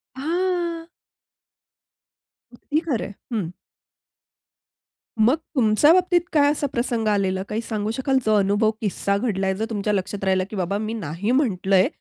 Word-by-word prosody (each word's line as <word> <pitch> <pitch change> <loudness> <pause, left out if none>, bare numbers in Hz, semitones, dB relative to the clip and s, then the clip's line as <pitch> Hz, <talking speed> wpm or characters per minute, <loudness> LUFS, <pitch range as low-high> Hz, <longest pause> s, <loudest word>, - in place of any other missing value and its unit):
हां. 340 +2 -1 1.7
अगदी 295 +5 -2
खरं 305 -9 -2
आहे. 205 - -8 0.2
हं. 190 -7 -1 1.7
मग, 240 +7 +5 0.2
तुमच्या 235 +5 +5
बाबतीत 360 -1 +3
काय 285 -1 +5
असा 290 -1 -1
प्रसंग 235 -2 -1
आलेला 190 -2 +1
काही 220 +2 -2
सांगू 215 -2 -3
शकाल 265 +2 0
जो 215 - +3
अनुभव 205 +3 +2
किस्सा 200 -1 0
घडलाय, 195 -4 0
जो 220 +3 -2
तुमच्या 210 -1 -1
लक्षात 195 +1 -3
राहिला 190 -1 +2
की 215 - -7
बाबा 190 +2 -1
मी 215 +1 -3
नाही 200 +2 -3
म्हंटलंय 195 -8 +3
215 Hz, 140 wpm, -23 LUFS, 200-275 Hz, 1.7 s, मग